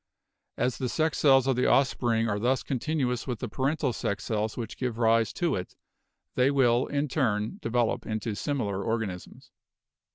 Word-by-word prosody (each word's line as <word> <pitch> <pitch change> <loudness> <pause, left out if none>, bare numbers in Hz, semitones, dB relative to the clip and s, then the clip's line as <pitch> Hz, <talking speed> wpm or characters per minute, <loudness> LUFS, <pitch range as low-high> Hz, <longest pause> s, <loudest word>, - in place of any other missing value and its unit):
As 125 - 0
the 130 -2 -1
sex 155 +4 0
cells 135 -3 +5
of 135 -1 +2
the 125 - +2
offspring 120 -4 +2
are 105 -2 -1
thus 125 +3 +1
continuous 130 -2 -1
with 125 -3 -2
the 125 - -4
parental 135 +2 -1
sex 100 -1 -3
cells 110 -1 -2
which 120 -1 -5
give 125 -3 -2
rise 115 -1 +3
to 175 -1 0
it, 90 -1 -6 0.6
they 125 +1 +3
will 125 -3 +3
in 145 +1 -1
turn 110 -7 -1
develop 120 0 0
into 110 0 -2
similar 100 -5 -2
organisms. 110 -5 -4
120 Hz, 165 wpm, -28 LUFS, 110-135 Hz, 0.6 s, cells